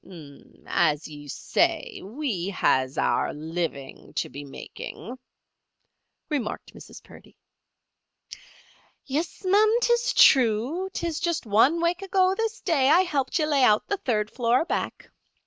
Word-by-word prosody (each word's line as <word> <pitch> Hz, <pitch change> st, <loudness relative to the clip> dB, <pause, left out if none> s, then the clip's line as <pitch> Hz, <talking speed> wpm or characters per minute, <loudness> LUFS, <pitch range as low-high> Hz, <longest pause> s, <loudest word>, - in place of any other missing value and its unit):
"As 155 Hz, -3 st, +1 dB
you 145 Hz, -1 st, -11 dB
say, -, -, -1 dB
we 210 Hz, -, -3 dB
has 130 Hz, -8 st, +1 dB
our -, -, +1 dB
living 155 Hz, -3 st, -5 dB
to -, -, -2 dB
be 140 Hz, -, -8 dB
making," 230 Hz, -, -9 dB, 1.1 s
remarked 275 Hz, -8 st, -4 dB
Mrs. -, -, -13 dB
Purdy. -, -, -17 dB, 1.7 s
"Yis, 310 Hz, +8 st, -4 dB
ma'am; 425 Hz, +4 st, +4 dB
'tis 475 Hz, 0 st, +1 dB
true. 260 Hz, -, +4 dB
'Tis 335 Hz, -4 st, -3 dB
just 340 Hz, -5 st, -2 dB
one 240 Hz, +11 st, +3 dB
wake 340 Hz, +2 st, 0 dB
ago 380 Hz, -1 st, +2 dB
this 450 Hz, +2 st, -3 dB
day 280 Hz, -7 st, +2 dB
I 340 Hz, +5 st, +6 dB
helped 290 Hz, -6 st, -1 dB
ye 310 Hz, -, +1 dB
lay 285 Hz, -3 st, +2 dB
out 215 Hz, -3 st, +4 dB
the 405 Hz, -, -2 dB
third 215 Hz, -, -1 dB
floor, 245 Hz, +4 st, +1 dB
back. -, -, -4 dB
270 Hz, 130 wpm, -25 LUFS, -, 1.7 s, I